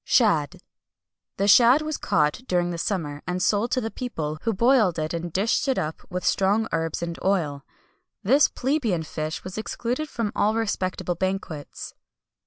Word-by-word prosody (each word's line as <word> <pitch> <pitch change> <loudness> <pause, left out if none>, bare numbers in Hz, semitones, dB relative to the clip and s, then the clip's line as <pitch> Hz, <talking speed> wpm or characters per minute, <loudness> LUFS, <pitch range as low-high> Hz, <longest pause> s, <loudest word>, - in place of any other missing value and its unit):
SHAD. 165 - +2 0.7
The 200 - +1
shad 245 +8 +6
was 310 -1 -3
caught 150 +6 +1
during 175 -1 +1
the 170 - -4
summer, 155 -7 -2
and 180 0 -1
sold 210 +5 +1
to 255 - +1
the 225 - -3
people,[XXI 160 -8 -5
180] - - +5
who 225 - 0
boiled 220 -10 +4
it 155 +1 -2
and 170 0 -4
dished 205 - +1
it 265 - +1
up 155 +1 -3
with 180 0 -4
strong 205 +3 +2
herbs 165 0 -2
and 170 -1 -4
oil. 155 -8 0 0.6
This 275 +9 +5
plebeian 245 - -1
fish 155 0 -5
was 185 +3 -6
excluded 245 +7 -3
from 230 -6 -2
all 215 +2 +2
respectable 185 -5 -1
banquets. 185 -4 -4
190 Hz, 170 wpm, -25 LUFS, 165-225 Hz, 0.7 s, shad